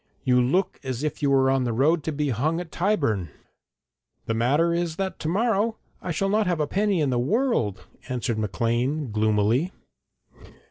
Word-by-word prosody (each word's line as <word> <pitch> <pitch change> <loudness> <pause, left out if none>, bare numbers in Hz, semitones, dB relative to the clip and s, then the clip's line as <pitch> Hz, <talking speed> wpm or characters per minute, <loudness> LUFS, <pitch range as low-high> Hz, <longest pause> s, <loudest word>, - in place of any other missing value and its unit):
You 125 -2 +3
look 180 +10 0
as 130 0 -4
if 150 - -3
you 145 - +2
were 135 -1 +4
on 135 -1 +2
the 120 -2 -1
road 150 +8 +2
to 160 - -1
be 150 -1 -1
hung 150 +8 0
at 175 -3 -7
Tyburn.' 140 - 0 1.0
'The 115 - -1
matter 145 +9 +2
is 170 -1 -1
that 190 +1 -3
to - - -4
morrow 220 +4 +1 0.2
I - - -6
shall 175 +4 0
not 210 0 +2
have 175 -3 0
a 150 - +2
penny 200 +2 +1
in 140 -3 +1
the 120 - +1
world,' 155 - 0 0.2
answered 120 -3 -2
Maclean, 120 +6 -1
gloomily. 110 - +1
145 Hz, 180 wpm, -25 LUFS, 120-180 Hz, 1.0 s, were